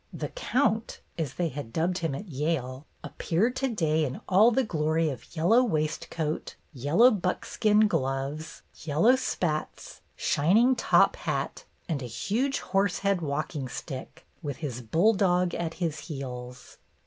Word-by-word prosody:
''The - - -5
Count," 230 - 0 0.2
as 155 -6 -3
they 175 -2 0
had 140 -5 -7
dubbed 175 +6 0
him 165 -5 -2
at 200 +8 -7
Yale, 140 -3 -2 0.2
appeared 220 +10 0
to 270 - 0
day 160 -8 +1
in 135 -3 -3
all 205 +5 +6
the 260 +3 +2
glory 160 -4 0
of 135 - -10
yellow 185 +10 +4
waistcoat, 155 -4 -2 0.2
yellow 155 - +4
buckskin 210 +2 +2
gloves, 135 -1 -3
yel 150 -1 -3
low 245 +4 +7
spats, 175 -11 -3
shining 220 - +3
top 230 - +4
hat, - - -3 0.2
and 155 -5 -2
a 125 - -5
huge 245 - -1
horse 195 -1 +1
head 195 -3 +2
walking 145 -2 -3
stick, 130 +1 -8 0.2
with 145 -5 -4
his 130 -6 -5
bulldog 180 - +2
at 165 -1 -3
his 160 -3 -2
heels. 125 -4 -8
165 Hz, 145 wpm, -27 LUFS, 145-205 Hz, 0.2 s, low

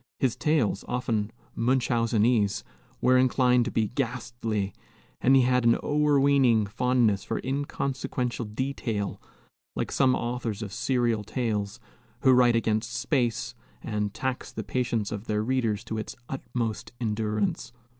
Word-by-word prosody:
His 130 -4 +1
tales, 150 -11 +1
often 115 -4 -1 0.2
Munchausenese, 115 -3 +2 0.4
were 130 0 +5
inclined 125 -1 +3
to - - -3
be 110 -2 0
ghastly, 120 -5 -2 0.5
and 135 +2 +5
he 130 - +6
had 125 0 +2
an 115 0 +5
o'erweening 140 -6 +3
fondness 115 -2 +1
for - - -3
inconsequential 135 -3 -2
detail, 110 -2 -3 0.5
like - - -2
some 130 -2 +3
authors 120 -3 -3
of 100 - -7
serial 120 -3 +1
tales, 105 -2 -2 0.4
who 130 - +6
write 125 -2 +5
against 115 0 0
space 125 -3 0 0.3
and 105 -3 -2
tax 130 +4 -3
the - - -5
patience 120 -4 -1
of 105 0 -5
their 105 -1 0
readers 115 -4 0
to 110 -2 -4
its 110 - -6
utmost 120 -5 -4
endurance. 105 -2 -1
120 Hz, 130 wpm, -27 LUFS, 110-130 Hz, 0.5 s, he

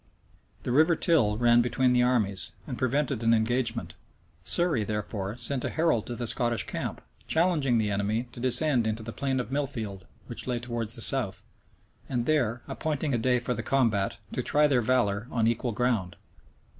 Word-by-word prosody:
The - - -3
River 160 +6 +4
Till 125 - +2
ran 120 0 +4
between 125 +1 +1
the 125 - +3
armies, 110 -6 0
and 130 - -5
prevented 130 0 -1
an 115 0 +3
engagement: 115 -5 -1 0.5
Surrey 165 - +4
therefore 105 0 -4
sent 135 0 -3
a - - -2
herald 160 -9 0
to 120 - -4
the 120 - -4
Scottish 120 0 0
camp, - - -5 0.3
challenging 160 -7 +1
the 105 -2 0
enemy 105 +5 -1
to - - -11
descend 130 -1 +4
into 110 0 -3
the 115 - -7
plain 135 -2 -2
of 125 - -5
Milfield, 110 - -4 0.2
which - - -5
lay 125 -1 -1
towards 120 -1 -2
the 115 - +4
south; 125 -8 +4 0.7
and 120 -2 -1
there, 125 -6 0
appointing 155 -2 -3
a 120 - +1
day 125 +2 +2
for 125 +1 -2
the - - -4
combat, 115 -8 0 0.2
to - - -1
try 150 +1 +2
their 135 -4 +2
valor 110 -3 0
on 115 -2 0
equal 115 +1 0
ground. 110 -5 -1
120 Hz, 180 wpm, -27 LUFS, 110-130 Hz, 0.7 s, River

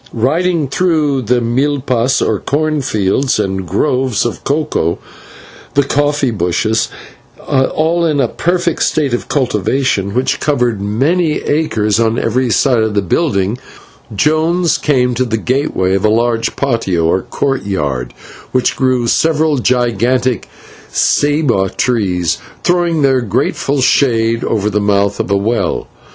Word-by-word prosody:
Riding 160 +6 0
through 150 -4 +1
the 125 +1 +1
/milpas/, 130 0 0
or - - 0
corn 155 +1 -1
fields, 110 +3 0
and 95 -3 -2
groves 125 - 0
of 120 - -4
cocoa 140 - -1 0.8
and 140 0 +2
coffee 145 -2 +1
bushes, 110 +3 0 0.6
all 160 +5 +1
in 155 -4 +1
a 130 - +2
perfect 175 +4 -1
state 145 -5 +1
of 120 - -3
cultivation, 125 -4 0
which 130 +1 0
covered 125 -8 0
many 150 - +1
acres 110 -9 0
on 115 0 +1
every 125 +2 0
side 125 +1 +2
of 110 -1 -1
the 100 - +1
building, 100 - 0 0.6
Jones 160 - +1
came 125 -4 +1
to 125 +2 0
the 115 -3 -1
gateway 125 -7 0
of 95 - 0
a 110 - +4
large 115 +1 0
/patio/, 115 -11 0
or 90 +3 +2
courtyard, 95 - -2 0.4
where 130 -1 +1
grew 130 -2 +1
several 155 +4 +2
gigantic 125 -1 0 0.4
/ceiba/ 145 - +1
trees, 90 -9 0 0.2
throwing 175 -3 +1
their 135 -2 +3
grateful 135 +5 -1
shade 115 -4 +2
over 105 -2 -1
the 105 0 0
mouth 100 0 +1
of - - -2
a 100 - +2
well. 100 -2 -1
125 Hz, 135 wpm, -14 LUFS, 105-145 Hz, 0.8 s, a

